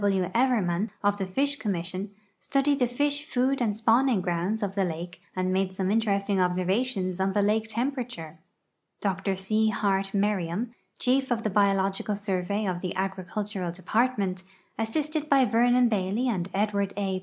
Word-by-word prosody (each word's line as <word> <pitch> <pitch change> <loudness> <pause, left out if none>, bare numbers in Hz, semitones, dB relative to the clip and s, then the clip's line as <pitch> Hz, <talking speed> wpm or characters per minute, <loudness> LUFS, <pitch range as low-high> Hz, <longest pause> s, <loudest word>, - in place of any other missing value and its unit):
B. - - 0
W. 190 -2 +1
Evermann, 220 -6 +2
of 205 0 +2
the 190 - -2
Fish 280 +8 0
Connnission, 185 0 -3 0.3
studied 275 +1 +1
tlie 250 - +3
fisii 290 +3 0
food 265 -1 0
and 215 -4 +1
s]uivvnin<,' 230 +1 +3
grounds 180 +6 -1
of 195 -1 -2
the 195 -1 +1
hike 175 +2 -7 0.2
and 185 0 0
made 190 0 0
some 190 0 0
interesting 200 -3 +1
observations 185 +1 0
on 190 0 +1
tiie 205 -1 +3
hike 220 +1 +1
temi)erature. 235 - -3 0.6
Dr 195 0 -1
C. 215 +3 +1
Hart 195 -2 +1
IMerriam, 200 +1 0 0.3
chief 265 +1 +1
of 235 -2 0
the 215 - 0
Biological 195 0 +2
Survey 200 +1 -1
of 180 -2 -2
the 180 - -3
Agricultural 190 0 -3
Department, 195 0 0 0.4
assisted 300 +7 -1
by 270 -2 +5
Vernon 245 +1 +4
Bailey 210 +3 0
and 190 -6 -1
Edwanl 200 0 0
A. 190 -2 -1
205 Hz, 160 wpm, -27 LUFS, 190-235 Hz, 0.6 s, by